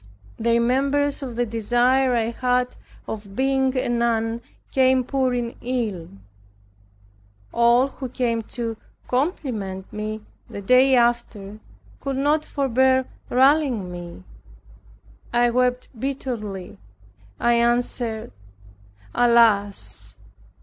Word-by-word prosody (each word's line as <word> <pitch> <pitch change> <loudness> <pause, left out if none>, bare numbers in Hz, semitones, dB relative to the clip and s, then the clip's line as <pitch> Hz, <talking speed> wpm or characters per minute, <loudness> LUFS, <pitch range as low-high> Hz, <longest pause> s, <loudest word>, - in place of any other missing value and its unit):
The 230 +1 +2
remembrance 275 +5 +1
of 255 -4 -6
the 245 +1 +1
desire 245 +3 +2
I 230 0 0
had 250 +1 0 0.3
of 205 -2 -7
being 265 0 +1
a 255 - 0
nun, 235 -1 0 0.3
came 260 -1 +3
pouring 245 -3 -1
in. 205 - -4 1.3
All 235 +3 +4
who 260 -1 -7
came 235 -2 -1 0.2
to 230 -2 -3 0.3
compliment 245 - -2
me, 215 +1 -4 0.3
the - - -7
day 255 +6 +5
after, 235 -4 0 0.4
could 275 -1 -3
not 295 +3 +2
forbear 260 -2 +2 0.2
rallying 260 - +3
me. 175 - -9 1.1
I 240 0 +3
wept 250 +1 +1
bitterly. 220 - -5 0.6
I 240 - +3
answered, 235 -1 0 0.8
"Alas! 230 -4 +2
240 Hz, 100 wpm, -23 LUFS, 225-260 Hz, 1.3 s, day